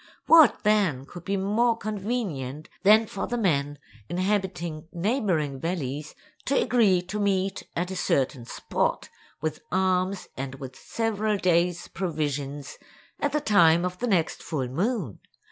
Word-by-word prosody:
What, 320 -6 +6
then, 195 -11 +2
could 175 +4 -11
be 200 0 0
more 225 +4 +2
convenient 195 - -4
than 215 +3 +6
for 195 -2 -4
the 240 - -2
men 145 -9 0 0.3
inhabiting 180 -4 -2
neighboring 175 - 0
valleys 150 -3 -4 0.3
to 275 - +2
agree 200 -8 +3
to 195 +4 -5
meet 195 -1 0
at 180 +2 -2
a - - -4
certain 135 -7 0
spot, - - -2 0.3
with 155 0 -3
arms 185 +1 +1
and 135 0 -5
with 130 -1 -9
several 215 -2 -1
days' 175 -1 +1
provisions, 145 -5 -3 0.4
at 290 - 0
the 300 - 0
time 175 - +5
of 180 0 -4
the 245 - -1
next 180 -7 +1
full 140 -6 -3
moon? 180 - -2
180 Hz, 140 wpm, -26 LUFS, 155-210 Hz, 0.4 s, What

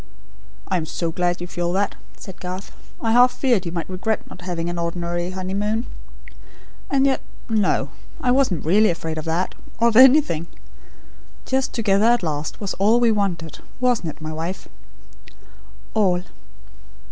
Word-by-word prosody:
"I 185 - +1
am 160 -2 -3
so 165 +1 -2
glad 175 +1 -1
you - - -3
feel 175 -1 -2
that," 200 +2 +1 0.2
said 190 -2 -10
Garth. 185 +2 -6 0.3
"I 225 - +1
half 245 +2 +6
feared 235 -11 +1
you - - -3
might 170 -2 -3
regret 195 +4 -2
not 180 - -12
having 175 -2 -3
an 175 0 -3
ordinary 175 +1 -2
honeymoon 200 +5 -2 1.0
And 275 -1 +3
yet, 270 -1 +2 0.3
no! 215 -4 +1 0.3
I 250 - +1
wasn't 245 - +2
really 210 +6 +5
afraid 160 -2 -3
of 155 - -7
that, 170 +3 -1 0.3
or 235 0 +5
of 225 - -3
anything. 260 - +6 1.0
Just, 265 0 0
together 210 -3 +2
at 240 -3 +3
last, 150 -2 -3
was 200 -3 -3
all 215 +4 +4
we 235 -2 +4
wanted. 180 -7 -2 0.2
Wasn't 245 -9 +1
it, 155 - -9
my 155 0 -4
wife?" 165 +4 -5 1.3
"All." 185 -5 +2
185 Hz, 160 wpm, -22 LUFS, 170-225 Hz, 1.3 s, half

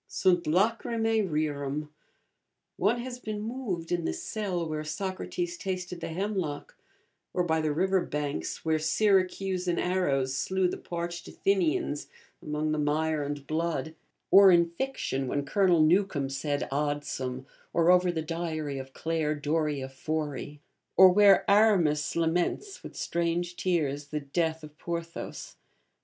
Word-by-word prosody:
Sunt 180 -3 +2
lacrymae 225 +5 +1
rerum; 150 -1 -2 0.9
one 210 +6 +2
has 250 0 -6
been 215 -3 -4
moved 210 -7 -4
in 175 -1 0
the - - -1
cell 190 -6 -3
where 155 -1 -3
Socrates 195 - -4
tasted 180 - -4
the - - -3
hemlock; 180 -4 -3 0.6
or 180 - +2
by 160 -2 +1
the 155 -1 0
river 190 +4 +2
banks 150 +1 -4
where 160 -1 +2
Syracusan 185 0 +1
arrows 140 -8 +1
slew 185 +7 +1
the - - -4
parched 170 0 -5
Athenians 170 -6 0 0.3
among 150 0 -2
the 155 - 0
mire 155 +1 +1
and 145 -1 -5
blood; 160 +1 -2 0.4
or, 195 0 +9
in 170 -2 +4
fiction, 170 - -2
when 145 +2 -1
Colonel 180 +1 +3
Newcome 160 -4 +2
said 145 +1 -2
Adsum, 140 -3 -2 0.3
or 170 +1 +4
over 180 0 +4
the 160 -2 -3
diary 155 -3 -3
of 135 0 -9
Clare 160 -2 -1
Doria 150 -2 -1
Forey, 145 +1 -4 0.4
or 190 0 +10
where 195 0 +6
Aramis 195 -8 +3
laments, 175 - 0
with - - -10
strange 170 +1 -1
tears, 145 -6 -1
the 150 +1 -3
death 160 +2 -1
of 150 0 -11
Porthos. 170 -1 -6
165 Hz, 135 wpm, -28 LUFS, 150-185 Hz, 0.9 s, or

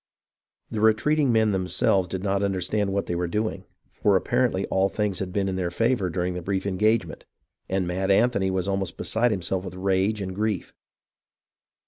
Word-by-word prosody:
The 105 - -2
retreating 125 +6 +3
men 110 -2 +3
themselves 95 +1 +1
did 95 +1 -4
not 100 -1 0
understand 100 +1 0
what 100 0 -1
they - - -3
were 85 0 -1
doing, 105 +5 -2 0.3
for 100 -2 +2
apparently 120 -1 +1
all 95 +1 +1
things 105 -2 -1
had 95 -1 -4
been 95 +1 0
in 95 -1 -2
their 90 -2 -1
favour 115 +1 +1
during 90 +1 -2
the 90 - -4
brief 95 +2 -2
engagement, 105 +4 0 0.5
and 95 -1 0
Mad 95 +2 -2
Anthony 100 -1 +3
was 95 0 -1
almost 95 -1 -2
beside 120 +2 +1
himself 95 -2 -1
with 95 -1 -7
rage 95 +3 +1
and 95 -1 -4
grief. 105 -2 -2
95 Hz, 175 wpm, -25 LUFS, 95-110 Hz, 0.5 s, retreating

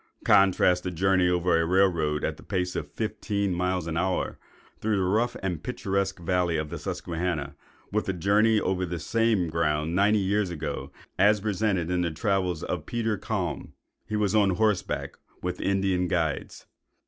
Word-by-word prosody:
Contrast 90 -2 +4
the 90 - -3
journey 90 +1 +2
over 90 -1 +2
a - - +1
rail 95 +4 +4
road 75 -4 -1
at - - -2
a - - -11
pace 90 -1 -2
of - - -4
fifteen 100 -3 -2
miles 90 0 -1
in 80 - -3
the 80 - 0
hour, 95 +1 -1 0.4
through 110 0 0
the 95 - +1
rough, 110 +6 +1
the 95 -2 -3
picturesque 95 0 -2
valley 90 -1 0
of 75 -1 -3
the - - -5
Susquehanna, 80 -5 -3 0.4
with 105 0 -1
a - - +1
journey 105 +5 +3
over 95 -1 -1
the 90 -1 -3
same 110 -2 +1
ground 80 0 0
ninety 105 +3 +4
years 100 0 +1
ago, 85 -4 -5 0.3
as 105 +1 +5
presented 95 -4 0
in 90 0 +1
the 85 - 0
travels 90 -1 -1
of 85 -4 -4
Peter 115 -2 -1
Kalm. 95 -5 -3 0.3
He 110 - -3
was 105 -2 +1
on 105 -2 +4
horseback, 105 -1 -1 0.2
with 90 0 -3
Indian 95 -2 +1
guides. 85 -4 -2
95 Hz, 175 wpm, -27 LUFS, 85-100 Hz, 0.4 s, as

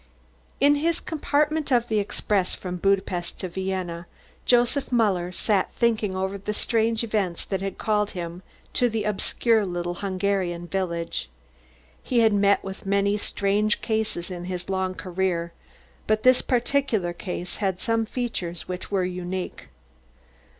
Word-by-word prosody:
In 285 +2 +5
his 335 +3 +1
compartment 300 -1 0
of 240 -2 +3
the 220 -2 +2
express 200 -1 0
from 180 -1 -5
Budapest 190 -2 0
to 185 - -3
Vienna, 180 -2 -3 0.4
Joseph 245 +3 +3
Muller 195 -7 +2
sat 195 +1 +1
thinking 220 -5 +1
over 190 +1 -2
the 210 +2 -3
strange 225 0 +1
events 205 -6 -1
that 195 -1 -2
had 195 0 -3
called 210 -1 +1
him 170 +1 -5 0.3
to 245 -1 +3
the 220 -1 -1
obscure 215 +2 +2
little 175 -2 -2
Hungarian 190 -3 0
village. 170 - -2 0.7
He 245 -2 +2
had 220 -2 +5
met 200 0 +4
with 195 0 -7
many 200 +1 +2
strange 210 +1 +1
cases 220 -5 -1
in 175 -1 -5
his 180 +1 -4
long 190 -1 0
career, 175 -2 -1 0.5
but 215 0 +2
this 255 0 +6
particular 240 -8 +1
case 180 0 -5
had 190 -3 -1
some 225 +1 +1
features 185 -10 -3
which 180 0 -5
were 195 -2 +1
unique. 180 - -4
195 Hz, 145 wpm, -25 LUFS, 180-225 Hz, 0.7 s, this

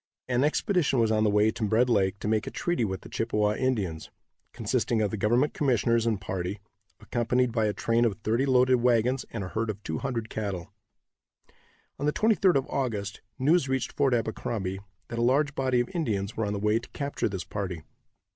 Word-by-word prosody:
An 125 +1 +1
expedition 155 -1 +1
was 115 -2 +3
on 110 0 +2
the 110 - +3
way 105 +1 +3
to 110 - -5
Red 110 +4 +3
lake 100 -4 +2
to - - -3
make 110 +1 +1
a - - -1
treaty 175 -8 -1
with 95 -3 -2
the - - -11
Chippewa 105 -2 0
Indians, 105 -10 -2 0.4
consisting 115 - 0
of 105 -2 +1
the - - -2
government 120 +8 +2
commissioners 115 -4 +2
and 110 -4 +1
party, 95 +1 -4 0.4
accompanied 120 +1 0
by 110 -2 +1
a - - +1
train 115 +2 +1
of 115 -4 +1
thirty 115 +5 +1
loaded 130 -1 +4
wagons 125 +1 +2
and 110 -4 -4
a 95 - -5
herd 110 +2 -2
of 105 -1 -5
two 80 - -3
hundred 120 -5 -3
cattle. 100 -6 -5 1.3
On 145 - -1
the 150 - +2
23d 210 -4 +3
of 135 -1 +2
August, 105 -7 -3 0.2
news 145 +1 +3
reached 130 -2 -1
Fort 135 -3 +2
Abercrombie 110 -4 -2 0.3
that 115 - -4
a - - +1
large 140 +4 +2
body 130 -2 +1
of 120 - -1
Indians 110 - -2
were 110 -2 -1
on 100 - -2
the - - -2
way 105 +2 +2
to 120 - -13
capture 140 -5 -2
this 95 -4 -4
party. 90 -6 -5
115 Hz, 205 wpm, -27 LUFS, 105-130 Hz, 1.3 s, loaded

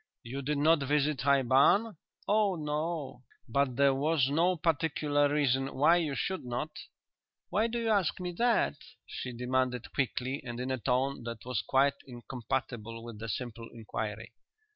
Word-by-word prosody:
"You 130 +4 -5
did 145 +2 -1
not 155 +2 +4
visit 145 0 +1
High 140 0 +3
Barn?" 140 - +4 0.3
"Oh 210 -2 +3
no." 150 -3 -3 0.3
"But 140 -3 +1
there 140 +1 +4
was 140 0 +1
no 175 +5 +3
particular 150 -2 +1
reason 135 -2 +1
why 155 +6 +5
you 155 -5 -1
should 190 +5 -2
not?" 125 +5 -3 0.8
"Why 215 +5 +2
do 235 +1 -3
you 230 -1 -1
ask 200 -6 +2
me 180 -1 -3
that?" 230 -4 +2 0.3
she 125 - -6
demanded 125 0 -1
quickly, 130 +1 -1
and 120 -2 -6
in 130 +1 -2
a 130 - -1
tone 130 +3 0
that 115 0 -6
was 125 -6 -1
quite 135 +6 +3
incompatible 120 -2 -4
with 115 -3 -9
the 115 0 -5
simple 115 +1 -5
inquiry. 110 0 -5
135 Hz, 160 wpm, -30 LUFS, 125-155 Hz, 0.8 s, why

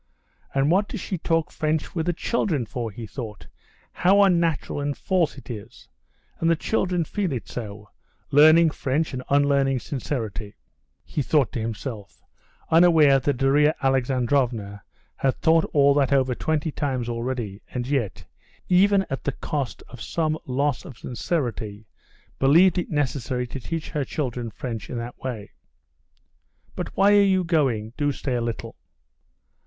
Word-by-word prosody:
"And 140 +3 +3
what 200 +3 +3
does - - -5
she 185 - -4
talk 165 -1 0
French 155 -1 -1
with 165 -1 -2
the 175 - +2
children 165 - -1
for?" 115 +1 -4
he 110 +2 -8
thought; 110 -3 -8 0.5
"how 195 +3 +4
unnatural 170 -6 +1
and 145 0 -2
false 180 -6 0
it 130 - -12
is! 110 -2 -9 0.5
And 165 - +2
the 165 - +4
children 180 -1 0
feel 195 -2 -2
it 120 -7 -4
so: 105 -3 -7 0.4
Learning 155 +3 +7
French 150 +2 -1
and 130 - -3
unlearning 140 -1 +3
sincerity," 115 -6 -4 0.5
he 150 - -2
thought 140 -3 +2
to - - -3
himself, 110 -1 -6 0.5
unaware 160 -5 +6
that 135 0 -1
Darya 145 +3 +3
Alexandrovna 125 -5 0 0.4
had 135 -1 +1
thought 165 0 +3
all 140 -1 +5
that 140 -2 +2
over 130 -2 +3
twenty 155 +4 -1
times 130 -5 -2
already, 115 -4 -3
and 125 -1 -3
yet, 130 -7 -2 0.4
even 195 +2 +4
at 135 - -4
the 145 - -1
cost 140 -3 -4
of 125 -2 -12
some 155 +2 -1
loss 140 +1 0
of 125 - -11
sincerity, 115 - -3 0.5
believed 170 +7 +5
it 175 - -4
necessary 130 -4 -1
to 130 +2 -7
teach 165 +5 -5
her 150 -2 -1
children 125 -4 -3
French 115 +1 -6
in 120 - -4
that 120 +1 -6
way. 115 -6 -6 1.2
"But - - -6
why 200 +1 +5
are 205 - +7
you 190 -2 +3
going? 130 -10 0
Do 145 -1 +1
stay 135 -1 -4
a 120 - 0
little." 115 -1 -4
140 Hz, 155 wpm, -24 LUFS, 120-160 Hz, 1.2 s, Learning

